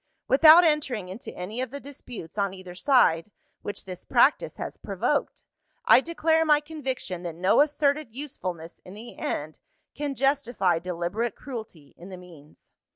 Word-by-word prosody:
Without 315 +5 +8
entering 275 - 0
into 195 +6 -8
any 210 +7 -5
of 260 - -3
the 280 +3 -7
disputes 250 - -10
on 200 -2 -1
either 185 -1 -10
side, 185 - +3 0.3
which 205 -1 -6
this 185 -2 -8
practice - - +2
has - - -6
provoked, - - -2 0.4
I - - +7
declare 320 0 +1
my 300 -2 +4
conviction 265 - -5
that 170 -2 -6
no 185 +9 +3
asserted 290 -2 +1
usefulness 180 - -6
in 185 - -12
the 230 +3 -10
end, 150 +1 -4 0.3
can 285 -2 -4
justify 245 - +1
deliberate 180 +6 -3
cruelty 220 - -9
in 175 +3 -12
the 185 - -8
means. 165 -5 -17
225 Hz, 155 wpm, -26 LUFS, 180-285 Hz, 0.4 s, Without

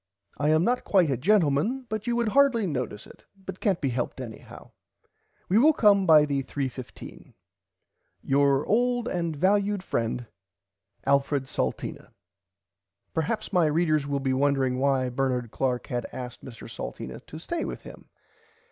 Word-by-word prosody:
I 145 +1 +2
am 155 +2 +4
not 245 +5 +1
quite 180 -7 +3
a - - +2
gentleman 185 - +2
but 215 0 -4
you 240 - +1
would 235 -2 +1
hardly 260 -3 +3
notice 125 - -4
it - - -16
but 190 -1 -9
cant 195 -5 0
be 140 - 0
helped 120 +1 -3
anyhow. 115 -4 -10 0.8
We 200 +4 +4
will 310 +5 +6
come 200 -6 +4
by 155 -2 +7
the 140 -2 -1
3 135 +1 -3
15. 125 0 -11 0.9
Your 140 0 +2
old 245 +2 +1
and 170 -3 -2
valud 200 +3 +1
friend 120 -5 -2 0.8
Alfred 140 0 +2
Salteena. 135 - -4 1.1
Perhaps 165 +7 -2
my 175 -4 +4
readers 155 -2 +1
will 140 -1 -1
be 135 -1 0
wondering 135 -2 +1
why 135 -2 +1
Bernard 125 -2 -1
Clark 125 -2 -1
had 120 -1 -3
asked 125 -1 -8
Mr 120 -5 -10
Salteena - - -7
to 155 - -9
stay 330 - -4
with - - -5
him. - - -13
150 Hz, 155 wpm, -26 LUFS, 130-200 Hz, 1.1 s, by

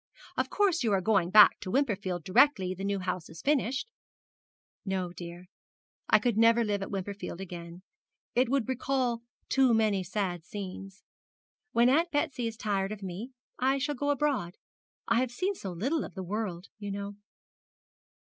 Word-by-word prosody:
'Of - - 0
course 380 -7 +2
you 225 - +2
are 195 - +3
going 190 -3 +2
back 210 +2 +8
to - - -6
Wimperfield 200 - 0
directly 190 - +4
the 190 +1 -7
new 200 0 0
house 185 -2 -3
is 160 - -11
finished?' 275 - 0 0.9
'No, 185 -3 -2
dear, 175 0 -9 0.6
I - - +7
could 240 -4 0
never 230 +1 +5
live 205 -2 -1
at 195 - -4
Wimperfield 195 -2 -5
again, 175 -1 -8 0.5
it 250 0 +3
would 270 -3 +1
recall 260 -2 0 0.3
too 260 -3 +4
many 210 -4 +2
sad 180 -3 -2
scenes. 195 0 -8 0.7
When 235 0 +4
Aunt 320 +7 +3
Betsy 275 -6 -1
is 225 -1 -6
tired 200 -2 -1
of 210 -2 -6
me 195 +8 -6 0.3
I 265 +2 +2
shall 290 +2 -1
go 285 +1 -2
abroad. 280 -11 0 0.5
I 230 0 +3
have 255 0 +1
seen 370 +11 -1
so 195 - -6
little 260 - -1
of - - -9
the 190 - -4
world, 190 -2 -4
you 205 -1 -5
know.' 200 0 -4
210 Hz, 170 wpm, -29 LUFS, 185-260 Hz, 0.9 s, back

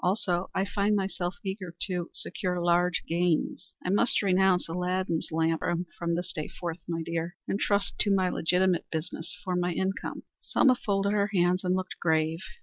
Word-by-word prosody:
Also, 180 -1 +1
I 190 - +2
find 205 +1 +1
myself 190 -2 -1
eager 190 -3 -4
to 180 -3 -3
secure 180 0 -3
large 175 +1 +2
gains. 175 +1 0
I 180 - +1
must 210 +2 +3
renounce 190 -1 +3
Aladdin's 180 0 -1
lamp 160 0 +1 0.4
from 170 -1 0
this 175 +1 -3
day 155 -4 -3
forth, 170 -1 -5
my 165 -1 -2
dear, 170 +2 -3
and 200 - -1
trust 200 -1 +1
to - - +3
my 190 -2 +3
legitimate 180 +1 +2
business 160 +2 -3
for 185 -1 -1
my 180 0 +1
income." 190 +3 -2 0.2
Selma 265 -3 +4
folded 200 -4 0
her 205 0 +2
hands 180 +1 +3
and 180 0 +2
looked 185 0 -4
grave. 160 0 +2
180 Hz, 170 wpm, -28 LUFS, 170-190 Hz, 0.4 s, Selma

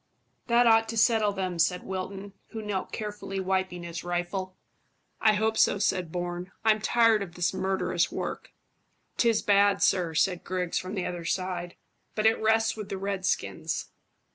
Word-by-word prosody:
"That 240 0 +4
ought 225 -1 +5
to 230 - -3
settle 220 -2 +4
them," 185 -3 -3
said 180 +2 +2
Wilton, 190 +1 -5
who 220 -1 -7
knelt 205 -3 -3
carefully 205 -2 -5
wiping 185 -2 -1
his 170 0 -6
rifle. 175 +2 -3 0.6
"I 215 -1 +5
hope 220 +1 +1
so," - - +4
said 185 -4 0
Bourne. 175 +1 -4
"I'm 215 -1 +4
tired 230 -1 +4
of 175 -3 -6
this 175 +1 0
murderous 185 -2 0
work." - - -5 0.7
"'Tis 230 -2 +3
bad, 200 0 +4
sir," 175 -4 +2
said 180 +2 +1
Griggs, 180 -2 -1
from 185 +3 -6
the 185 - -2
other 175 -1 -4
side; 180 -1 -2 0.4
"but 215 - 0
it 220 0 +4
rests 220 0 +2
with 215 -2 -7
the 195 - -3
redskins." 195 -1 -2
190 Hz, 165 wpm, -28 LUFS, 180-215 Hz, 0.7 s, ought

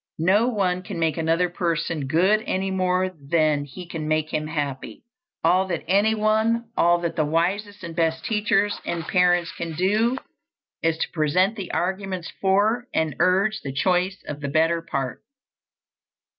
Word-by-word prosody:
No 195 +8 +3
one 190 -6 0
can 185 0 -7
make 160 -2 +1
another 165 +2 +1
person 165 -4 -2
good 185 +9 +3
any 190 +1 -1
more 185 0 +1 0.2
than 155 -3 +2
he 175 +6 -9
can 165 -3 -5
make 155 0 0
him 155 0 -1
happy. 145 -4 -4 0.4
All 185 +1 +3
that 170 -4 -3
anyone, 220 +3 +2
all 175 0 +4
that 170 -1 -2
the 155 - +2
wisest 190 +7 -1
and 165 -1 -7
best 160 -1 0
teachers 210 -2 +1
and 170 -1 -3
parents 175 -2 +3
can 165 -1 -5
do, 215 +8 +2 0.6
is 165 0 +1
to - - -3
present 180 +7 +2
the 195 -5 -6
arguments 190 -1 -2
for 210 +5 +2
and 155 -4 0
urge 195 +4 +2
the 135 - -5
choice 180 +6 0
of 150 0 -6
the 140 - -3
better 165 +3 +2
part. 135 -6 -4
180 Hz, 155 wpm, -24 LUFS, 160-200 Hz, 0.6 s, all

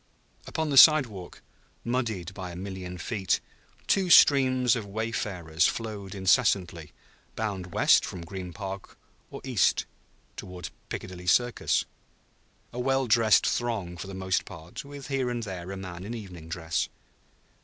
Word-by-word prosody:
Upon 160 -2 -2
the 140 - +1
sidewalk, 120 - +5 0.4
muddied 110 -7 -2
by 95 -2 -6
a 85 - -8
million 95 -1 -6
feet, 95 +1 -1 0.5
two 190 -2 +2
streams 130 -6 +6
of 115 - -3
wayfarers 100 -7 -1
flowed 105 -4 -5
incessantly, 95 -5 +2 0.4
bound 95 -5 -3
west - - +5
from 90 - -6
Green 90 0 -7
Park 95 0 -7 0.3
or - - -9
east - - +2 0.5
toward 90 -1 -8 0.2
Piccadilly 90 -1 -7
Circus; 120 +6 +2 0.9
a 125 - -5
well 135 +1 +1
dressed 115 -2 +4
throng 110 -8 -1
for 90 - -7
the 95 - -7
most 95 -1 0
part, 80 +1 -9
with 140 -1 -9
here 135 -2 0
and 120 -1 -3
there 95 -3 -6
a 95 - -5
man 90 -2 -7
in 115 +4 -5
evening 90 -7 -9
dress. 80 -1 -2
100 Hz, 140 wpm, -27 LUFS, 90-120 Hz, 0.9 s, streams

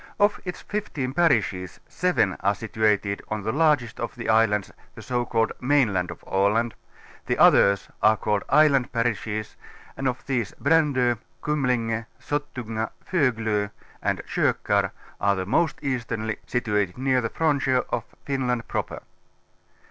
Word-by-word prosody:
Of 205 0 +3
its 180 - -5
fifteen 150 -11 -3
parishes 110 - +1
seven 180 +1 +1
are 100 +1 +1
situat 110 -2 +1
ed 100 0 -3
on 105 -1 -3
the 110 - -1
largest 145 -6 +2
of 120 - -4
the 120 - -5
islands, 110 -2 +3 0.2
the - - -10
so 120 -1 -1
called 115 -1 +1
mainland 120 -10 +2
of 85 - -9
Aland; 105 +4 +1 0.5
the - - 0
others 100 -1 +5
are 110 +1 +5
called 105 -1 0
island 140 -4 +4
parishes 115 -3 -2 0.4
and 135 - -2
of 125 -1 -3
these 120 -6 -1
^ - - -25
Brando, 135 -5 +3 0.2
Kumlinge, 120 -6 0
Sottunga, 120 -7 -3 0.2
Foglo 115 - +1 0.3
and - - -1
Kokax - - +1 0.3
are 100 0 +3
the 95 -1 -3
f^ - - -14
most 160 +10 +1
ea 130 -2 0
sternly, 110 -2 -4
situated 105 -5 0
near 130 0 +2
the 115 - -2
frontier 135 -5 +1
of - - -1 0.2
Finland 125 -4 -1
Proper. - - -4
120 Hz, 150 wpm, -25 LUFS, 110-135 Hz, 0.5 s, others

